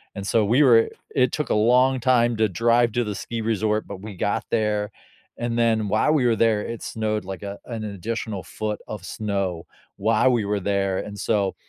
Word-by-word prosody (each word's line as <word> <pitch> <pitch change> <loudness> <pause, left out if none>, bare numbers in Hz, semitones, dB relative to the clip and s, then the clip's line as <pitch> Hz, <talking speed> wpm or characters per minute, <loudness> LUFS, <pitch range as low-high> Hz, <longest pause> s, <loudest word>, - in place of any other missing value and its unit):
and 100 - -5
so, 110 +1 +2
we 125 +8 +4
were 115 -4 +5 0.3
it 125 -2 +3
took 150 - -3
a - - +2
long 125 +4 +4
time 120 -1 +3
to 110 -1 +2
drive 115 +4 +2
to 120 - +1
the 105 - -3
ski 115 +3 -5
resort, 110 -1 0
but 95 -2 -8
we 105 -2 -8
got 100 - -1
there, 105 -2 0 0.5
and 120 0 -2
then 110 -2 +2
while 110 +9 +2
we 140 -5 +2
were 120 -2 +3
there, 110 -2 +2
it 115 +1 -6
snowed 110 -2 -2
like 95 +1 -7
a 100 0 -6
an 115 -3 -5
additional 105 -1 -4
foot 105 +6 -4
of 105 - -7
snow 100 -5 -3 0.3
while 115 +5 +3
we 115 -4 +1
were 105 0 0
there 100 -1 0
and, 105 -1 -7
so, 100 -2 0
110 Hz, 205 wpm, -23 LUFS, 100-115 Hz, 0.5 s, were